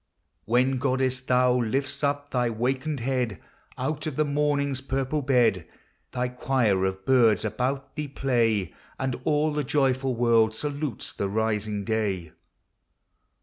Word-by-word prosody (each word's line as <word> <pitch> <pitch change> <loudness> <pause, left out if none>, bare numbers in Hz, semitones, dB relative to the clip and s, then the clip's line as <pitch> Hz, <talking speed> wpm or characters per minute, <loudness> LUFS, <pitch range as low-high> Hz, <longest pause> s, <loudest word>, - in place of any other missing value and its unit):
When, 125 +3 +2
goddess, 130 -1 +1
thou 125 -1 +3
lift'st 135 +5 -2
up 145 0 -1
thy 125 -2 +1
wakened 130 +5 -2
head 125 -4 -1 0.4
Out 150 +4 -2
of 150 - -4
the 155 - +2
morning's 140 -2 0
purple 135 +2 -1
bed, 120 -10 +2 0.4
Thy 125 0 -1
quire 125 -6 +1
of 95 0 -3
birds 115 -6 +4
about 135 +5 -2
thee 150 -1 -3
play. 115 - 0 0.2
And 130 -2 -2
all 150 0 +2
the 150 0 -1
joyful 130 -1 +1
world 115 -2 +3
salutes 145 -1 -3
the 100 - -2
rising 105 -1 -1
day. 100 -7 -1
130 Hz, 135 wpm, -26 LUFS, 110-140 Hz, 0.4 s, birds